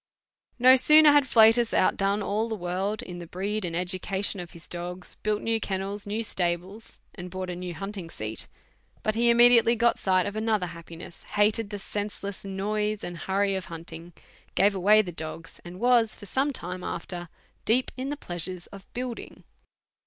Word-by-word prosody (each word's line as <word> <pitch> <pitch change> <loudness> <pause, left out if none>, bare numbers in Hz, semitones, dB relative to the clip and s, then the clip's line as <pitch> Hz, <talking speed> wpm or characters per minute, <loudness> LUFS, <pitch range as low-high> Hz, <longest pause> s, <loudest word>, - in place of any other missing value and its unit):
No 255 +1 +7
sooner 305 +3 +7
had 290 -2 +4
Flatus 225 0 +5
outdone 200 +2 +2
all 215 +4 -1
the 220 - -2
world 190 +3 -3
in 175 -1 -8
the 170 - -8
breed 200 +5 -3
and 170 -2 -3
education 190 +3 -2
of 175 -1 -7
his 170 -1 -14
dogs, 180 +1 -4
built 210 0 -1
new 225 0 +1
kennels, 200 +1 -4
new 215 +3 -2
stables, 185 +2 -3
and 180 -1 -8
bought 185 0 -5
a - - -5
new 180 -1 -6
hunting 195 -3 -6
seat, 110 -5 -5 0.6
but 215 - +1
he 235 +2 +3
immediately 235 0 +6
got 235 +1 +2
sight 185 -1 +2
of 205 0 -4
another 215 -3 0
happiness, 170 -1 -10
hated 210 +1 +1
the 205 - -5
senseless 200 0 -5
noise 210 +2 -2
and 175 - -5
hurry 195 +4 0
of 190 -1 -3
hunting, 165 +1 -9 0.4
gave 200 +1 +4
away 205 +3 +5
his 175 -3 -7
dogs, 160 +1 -7
and 175 +1 -10
was 240 -2 +4
for 205 - -11
some 270 +8 0
time 180 -6 -5
after 175 0 -5 0.3
deep 250 +3 +2
in 260 +2 -4
the 290 - -3
pleasures 175 - -6
of 195 -1 -13
building. 245 -1 -6
200 Hz, 175 wpm, -27 LUFS, 180-220 Hz, 0.6 s, No